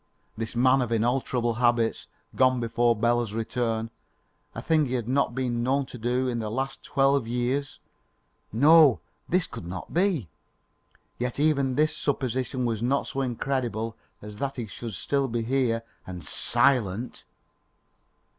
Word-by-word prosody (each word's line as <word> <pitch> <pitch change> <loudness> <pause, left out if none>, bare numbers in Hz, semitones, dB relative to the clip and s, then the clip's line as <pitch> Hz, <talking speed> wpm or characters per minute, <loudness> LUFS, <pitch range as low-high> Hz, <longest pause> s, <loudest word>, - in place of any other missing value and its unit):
this 115 +1 -5
man 130 +2 +4
of 120 -2 -2
inalterable 120 +1 0
habits 120 -1 +1 0.3
gone 130 -1 +3
before 120 0 +2
Bela's 120 0 +1
return 115 0 -2 0.6
a - - -4
thing 155 -3 +2
he 130 - -2
had 120 -3 -2
not 135 +3 +1
been 125 -3 -1
known 135 +3 +1
to 125 - -10
do 125 +3 0
in 120 -2 -1
the 110 -1 -3
last 135 +4 -3
twelve 135 -3 +2
years? 125 +4 -1 0.7
No, 145 +9 +6
no, 120 - -5 0.3
this 180 -1 +2
could 85 - -8
not 90 +1 -7
be. 175 - +1 0.9
Yet 125 +2 -2
even 140 -4 +2
this 155 +1 +2
supposition 130 -2 -1
was 115 -2 -1
not 135 +4 +1
so 135 - -3
incredible 120 -3 -2 0.3
as 105 0 -9
that 135 +3 -3
he 120 - -4
should 110 +1 -7
still 140 +8 0
be 115 -1 -2
here 120 -2 0 0.2
and 90 -4 -7
SILENT. 120 - +1
125 Hz, 150 wpm, -26 LUFS, 115-135 Hz, 0.9 s, No